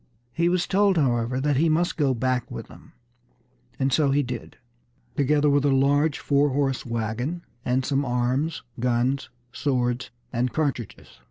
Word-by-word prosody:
He 170 Hz, +1 st, +2 dB
was 180 Hz, 0 st, +1 dB
told, 195 Hz, -1 st, +3 dB
however, 125 Hz, -3 st, +1 dB
that 145 Hz, 0 st, +1 dB
he 160 Hz, +3 st, +3 dB
must 170 Hz, +3 st, +1 dB
go 140 Hz, -4 st, +1 dB
back 125 Hz, 0 st, -1 dB
with -, -, -7 dB
them; -, -, -16 dB, 0.8 s
and 135 Hz, -1 st, 0 dB
so 150 Hz, -3 st, +3 dB
he 145 Hz, +1 st, +2 dB
did, 125 Hz, -2 st, -7 dB, 0.6 s
together 145 Hz, +1 st, +2 dB
with 145 Hz, -1 st, +3 dB
a 145 Hz, -, +3 dB
large 140 Hz, +3 st, +3 dB
four 145 Hz, 0 st, +2 dB
horse 135 Hz, -1 st, 0 dB
wagon 120 Hz, +9 st, -3 dB, 0.2 s
and 130 Hz, +1 st, 0 dB
some 140 Hz, 0 st, +1 dB
arms, 125 Hz, +5 st, -1 dB, 0.2 s
guns, 125 Hz, +3 st, 0 dB, 0.2 s
swords, 125 Hz, -3 st, -1 dB, 0.2 s
and 125 Hz, +1 st, 0 dB
cartridges. 140 Hz, -, -3 dB
135 Hz, 155 wpm, -25 LUFS, 125-150 Hz, 0.8 s, told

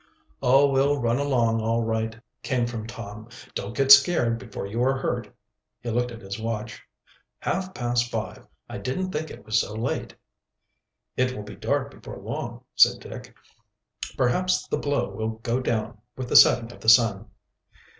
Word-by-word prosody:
"Oh! 135 Hz, +3 st, +5 dB
we'll 140 Hz, +1 st, +2 dB
run 120 Hz, +1 st, +1 dB
along 120 Hz, -5 st, +1 dB
all 115 Hz, +1 st, 0 dB
right," 110 Hz, 0 st, -2 dB, 0.2 s
came 125 Hz, -4 st, 0 dB
from 115 Hz, -2 st, -5 dB
Tom. 110 Hz, -1 st, -9 dB, 0.2 s
"Don't 100 Hz, +4 st, -5 dB
get 135 Hz, 0 st, +3 dB
scared 140 Hz, -5 st, +6 dB
before 115 Hz, -5 st, -7 dB
you 110 Hz, +4 st, -3 dB
are 135 Hz, +1 st, +2 dB
hurt." 130 Hz, -, -3 dB, 0.5 s
He 120 Hz, -, -4 dB
looked 120 Hz, +2 st, 0 dB
at 115 Hz, -2 st, -10 dB
his 95 Hz, +2 st, -6 dB
watch. 110 Hz, 0 st, -4 dB, 0.6 s
"Half 185 Hz, +1 st, -3 dB
past 120 Hz, 0 st, 0 dB
five! -, -, -5 dB, 0.2 s
I -, -, -7 dB
didn't 185 Hz, +9 st, -3 dB
think 160 Hz, 0 st, -3 dB
it -, -, -11 dB
was 110 Hz, 0 st, +2 dB
so 105 Hz, -, -6 dB
late." 115 Hz, +2 st, -3 dB, 1.0 s
"It 130 Hz, 0 st, +1 dB
will 105 Hz, -, -6 dB
be 105 Hz, -, -10 dB
dark -, -, -1 dB
before -, -, -10 dB
long," -, -, -6 dB
said -, -, +5 dB
Dick. -, -, -10 dB, 0.8 s
"Perhaps 180 Hz, +9 st, +1 dB
the -, -, -1 dB
blow 145 Hz, -1 st, 0 dB
will 110 Hz, 0 st, -3 dB
go 120 Hz, +2 st, 0 dB
down 115 Hz, -3 st, -2 dB, 0.2 s
with 130 Hz, -1 st, -5 dB
the -, -, -1 dB
setting 120 Hz, -1 st, +7 dB
of -, -, -14 dB
the 110 Hz, -, +2 dB
sun." 115 Hz, -3 st, +5 dB
120 Hz, 170 wpm, -25 LUFS, 110-130 Hz, 1.0 s, setting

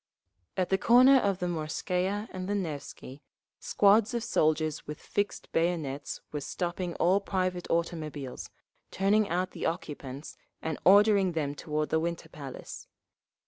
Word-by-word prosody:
At 185 Hz, -1 st, 0 dB
the 190 Hz, -, +2 dB
corner 255 Hz, +5 st, +7 dB
of 200 Hz, -6 st, +1 dB
the 180 Hz, -, -3 dB
Morskaya 180 Hz, +5 st, -2 dB
and 185 Hz, +1 st, -5 dB
the 205 Hz, -, 0 dB
Nevsky, 145 Hz, -6 st, -6 dB, 0.4 s
squads 210 Hz, +3 st, +3 dB
of 235 Hz, -, -1 dB
soldiers 155 Hz, -7 st, 0 dB
with 150 Hz, 0 st, -6 dB
fixed 205 Hz, 0 st, -3 dB
bayonets 160 Hz, -5 st, -1 dB
were 150 Hz, -, -3 dB
stopping 175 Hz, +3 st, -3 dB
all 185 Hz, +3 st, +3 dB
private 185 Hz, -2 st, -2 dB
automobiles, 155 Hz, -6 st, -3 dB, 0.4 s
turning 200 Hz, +2 st, +2 dB
out 180 Hz, +2 st, -1 dB
the -, -, -3 dB
occupants, 145 Hz, -4 st, -6 dB, 0.2 s
and 160 Hz, -2 st, -4 dB
ordering 200 Hz, -1 st, +6 dB
them 145 Hz, -3 st, -1 dB
toward 150 Hz, +1 st, -3 dB
the 160 Hz, -, +2 dB
Winter 170 Hz, +1 st, -3 dB
Palace. 135 Hz, -3 st, -9 dB
175 Hz, 140 wpm, -29 LUFS, 155-195 Hz, 0.4 s, corner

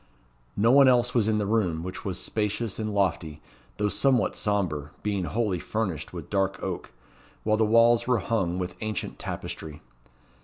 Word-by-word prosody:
No 115 Hz, +3 st, +4 dB
one 140 Hz, 0 st, +7 dB
else 125 Hz, -1 st, +3 dB
was 115 Hz, -4 st, +2 dB
in 110 Hz, -1 st, +2 dB
the 105 Hz, -, 0 dB
room, 95 Hz, -7 st, 0 dB
which 90 Hz, +1 st, -6 dB
was 95 Hz, -3 st, -3 dB
spacious 105 Hz, 0 st, -2 dB
and 110 Hz, -1 st, -2 dB
lofty, 80 Hz, -6 st, -1 dB, 0.4 s
though 105 Hz, -, +1 dB
somewhat 130 Hz, +3 st, +2 dB
sombre, 90 Hz, -9 st, -1 dB
being 100 Hz, -3 st, -1 dB
wholly 105 Hz, -3 st, -1 dB
furnished 90 Hz, -7 st, -3 dB
with 85 Hz, -4 st, -7 dB
dark 95 Hz, -2 st, 0 dB
oak; -, -, -4 dB, 0.5 s
while 110 Hz, 0 st, +2 dB
the 110 Hz, -, +3 dB
walls 115 Hz, +2 st, +4 dB
were 125 Hz, -1 st, +3 dB
hung 95 Hz, -4 st, -1 dB
with 90 Hz, 0 st, -3 dB
ancient 110 Hz, -1 st, -4 dB
tapestry. 75 Hz, -2 st, -6 dB
105 Hz, 165 wpm, -26 LUFS, 90-115 Hz, 0.5 s, one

